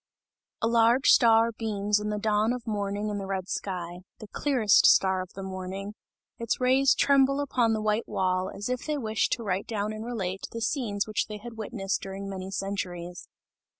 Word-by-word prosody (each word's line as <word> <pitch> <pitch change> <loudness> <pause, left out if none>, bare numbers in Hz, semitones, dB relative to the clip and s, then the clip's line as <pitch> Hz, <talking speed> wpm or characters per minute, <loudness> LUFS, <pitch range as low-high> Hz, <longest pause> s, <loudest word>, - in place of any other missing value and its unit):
A - - +4
large 235 +3 +4
star 230 -1 +6
beams 210 -2 -1
in 210 0 -3
the 210 - -2
dawn 215 +2 +1
of 250 -1 -6
morning 205 -1 -2
in 205 -1 -3
the 195 - -5
red 190 -1 -3
sky 175 -3 -4 0.2
the 215 - -10
clearest 240 -3 +3
star 190 -1 +4
of 185 - -8
the 195 - -7
morning 190 +2 -6 0.5
its 230 -1 -1
rays 260 +2 +4
tremble 275 0 +3
upon 250 -5 +1
the 215 - -1
white 215 +2 0
wall, 185 0 0
as 205 - -6
if 250 +2 -3
they 305 -1 0
wished 220 -5 -1
to 235 - -3
write 195 -2 -2
down 215 -1 -2
and 215 0 -6
relate, 195 -6 -4
the 230 - -4
scenes 220 -4 -1
which 215 -1 -1
they 210 - -6
had 235 +3 -9
witnessed 205 -3 -3
during 195 +1 -6
many 190 -1 -6
centuries. 180 -3 -5
210 Hz, 190 wpm, -27 LUFS, 195-230 Hz, 0.5 s, star